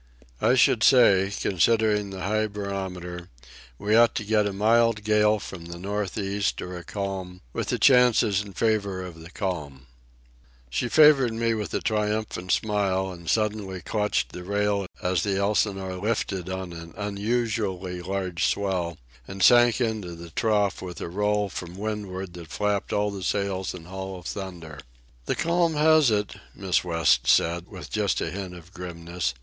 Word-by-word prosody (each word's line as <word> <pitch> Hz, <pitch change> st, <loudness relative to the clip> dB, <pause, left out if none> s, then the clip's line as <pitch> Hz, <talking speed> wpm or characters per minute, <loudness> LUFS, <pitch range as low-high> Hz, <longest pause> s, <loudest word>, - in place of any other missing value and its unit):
"I 125 Hz, -, +4 dB
should 120 Hz, -2 st, +4 dB
say, 100 Hz, -6 st, +5 dB
considering 105 Hz, +2 st, +2 dB
the 95 Hz, -2 st, -7 dB
high 110 Hz, +3 st, +1 dB
barometer, 95 Hz, -4 st, -5 dB, 0.5 s
we 105 Hz, +7 st, +1 dB
ought 115 Hz, 0 st, +5 dB
to -, -, -2 dB
get 105 Hz, 0 st, +2 dB
a -, -, -2 dB
mild 110 Hz, +2 st, +2 dB
gale 105 Hz, 0 st, +3 dB
from 90 Hz, -4 st, -8 dB
the 85 Hz, 0 st, -8 dB
north 100 Hz, +2 st, -3 dB
east 100 Hz, 0 st, -1 dB
or 90 Hz, 0 st, -6 dB
a 90 Hz, -, -7 dB
calm, 95 Hz, -1 st, -5 dB
with -, -, -3 dB
the -, -, 0 dB
chances 120 Hz, -6 st, +4 dB
in 100 Hz, -1 st, -9 dB
favour 100 Hz, -4 st, 0 dB
of 85 Hz, -2 st, -10 dB
the 80 Hz, +1 st, -11 dB
calm." 75 Hz, -, -4 dB, 0.9 s
She 75 Hz, -, -1 dB
favoured 140 Hz, -5 st, +6 dB
me 115 Hz, 0 st, 0 dB
with 105 Hz, -2 st, -3 dB
a -, -, -1 dB
triumphant 105 Hz, -4 st, -1 dB
smile, 95 Hz, -3 st, +1 dB
and 85 Hz, -2 st, -8 dB
suddenly 105 Hz, -4 st, -1 dB
clutched 105 Hz, +5 st, -1 dB
the 90 Hz, -, -8 dB
rail 100 Hz, 0 st, 0 dB, 0.2 s
as 90 Hz, -1 st, +1 dB
the 100 Hz, -2 st, 0 dB
Elsinore 100 Hz, -2 st, 0 dB
lifted 95 Hz, -3 st, -2 dB
on 95 Hz, -1 st, -5 dB
an 85 Hz, 0 st, -10 dB
unusually 105 Hz, -3 st, -2 dB
large 95 Hz, -2 st, -2 dB
swell 90 Hz, -5 st, -1 dB, 0.3 s
and 95 Hz, 0 st, -4 dB
sank 120 Hz, +1 st, +6 dB
into 110 Hz, -8 st, -2 dB
the 85 Hz, 0 st, -11 dB
trough 105 Hz, +1 st, +1 dB
with 90 Hz, -2 st, -7 dB
a -, -, -5 dB
roll 105 Hz, +2 st, 0 dB
from 90 Hz, -2 st, -7 dB
windward 100 Hz, -3 st, -4 dB
that 85 Hz, -2 st, -9 dB
flapped 105 Hz, +4 st, -1 dB
all 105 Hz, 0 st, +1 dB
the 100 Hz, -1 st, -6 dB
sails 95 Hz, 0 st, -1 dB
in 85 Hz, -2 st, -10 dB
hollow 95 Hz, 0 st, -7 dB
thunder. 85 Hz, -6 st, -7 dB, 0.5 s
"The -, -, 0 dB
calm 170 Hz, -1 st, +1 dB
has 155 Hz, -2 st, +5 dB
it," 105 Hz, -2 st, -1 dB, 0.2 s
Miss 95 Hz, -2 st, 0 dB
West 85 Hz, -8 st, +2 dB
said, 85 Hz, +5 st, +3 dB
with -, -, -10 dB
just -, -, 0 dB
a -, -, -2 dB
hint 95 Hz, -2 st, -6 dB
of 90 Hz, +2 st, -14 dB
grimness. 85 Hz, -3 st, -4 dB
100 Hz, 165 wpm, -25 LUFS, 90-105 Hz, 0.9 s, favoured